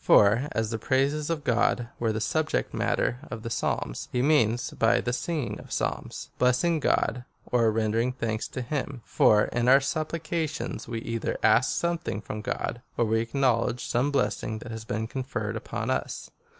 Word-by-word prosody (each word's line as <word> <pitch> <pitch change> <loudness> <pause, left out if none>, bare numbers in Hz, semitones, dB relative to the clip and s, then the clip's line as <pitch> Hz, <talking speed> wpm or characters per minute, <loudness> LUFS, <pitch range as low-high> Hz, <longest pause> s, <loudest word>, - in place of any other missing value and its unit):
For, 115 +8 +5
as 110 -1 -1
the 115 - -2
praises 140 +5 +1
of 160 -3 -2
God 120 -1 +1
were 115 -2 +1
the 110 - -2
subject 155 +7 0
matter 125 - 0
of 115 -2 -6
the 115 - -5
Psalms, - - -2
he 125 0 +1
means 120 -6 +3
by 115 - +3
the 120 - -2
singing 155 0 -2
of - - -11
Psalms'^ - - -3
— - - -36
blessing 125 +7 +3
God, 125 -3 +1 0.2
or 115 -2 +3
rendering 115 +2 +1
thanks 115 -3 -2
to 130 - -5
him, 135 -2 -4
for 105 0 +4
in 120 0 -1
our 135 +2 +8
sup 155 +3 -2
plications, 160 -1 -3
we 115 -1 -4
either 115 -1 -2
ask 110 +4 +5
something 170 -11 -1
from 105 0 -6
God, 120 0 -3 0.2
or 120 - +3
we 110 +1 +2
ac 115 +4 -4
knowledge 125 -2 +2
some 125 +4 +1
blessing 110 -5 0
that 115 +1 -8
has 110 -1 -6
been 110 0 -2
conferred 120 -3 -3
uj)on - - -3
us. - - -3
120 Hz, 185 wpm, -27 LUFS, 115-140 Hz, 0.2 s, our